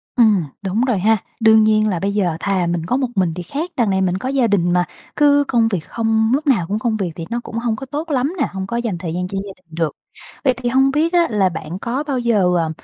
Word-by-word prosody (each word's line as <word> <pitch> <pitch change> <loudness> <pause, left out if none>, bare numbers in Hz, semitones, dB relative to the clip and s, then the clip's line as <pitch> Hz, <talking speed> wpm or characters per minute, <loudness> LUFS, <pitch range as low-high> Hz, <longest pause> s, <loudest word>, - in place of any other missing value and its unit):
Ừm, 215 -7 +4 0.2
đúng 200 +5 0
rồi 235 -7 +1
ha, 220 +3 +3 0.2
đương 220 -1 +6
nhiên 215 0 +3
là 175 -4 -1
bây 200 +2 -1
giờ 175 -6 0
thà 190 -3 0
mình 170 -1 -2
có 250 +8 0
một 260 -2 0
mình 180 -4 +1
thì 180 - -5
khác, 310 - -4
đằng 230 -4 +2
này 190 0 +1
mình 185 0 +1
có 255 +6 -4
gia 265 -4 +2
đình 175 -4 +2
mà, 180 -1 +2 0.3
cứ 285 -1 +4
công 230 -3 +3
việc 195 -6 -1
không, 225 +5 0
lúc 295 +2 0
nào 210 -11 +3
cũng 210 +2 -1
công 225 -1 0
việc 185 -5 -2
thì 165 - -6
nó 235 +1 -2
cũng 230 - -6
hông 230 -1 0
có 270 - -7
tốt 300 +4 -5
lắm 275 +5 0
nè, - - +2
hông 190 0 -4
có 235 - -2
dành 230 -7 -2
thời 170 -2 -5
gian 180 +1 -2
cho 195 - -5
gia 195 - -7
đình 165 -3 -17
được. 165 -2 0 0.5
Vậy 260 -2 +3
thì 245 -1 -2
hông 265 +2 +3
biết 320 +4 +1
á 345 -1 +4
là 200 -4 +2
bạn 165 +2 -6
có 255 +7 -2
bao 275 -4 -2
giờ, 200 -7 +2
à, 165 -1 0
215 Hz, 280 wpm, -19 LUFS, 185-250 Hz, 0.5 s, đương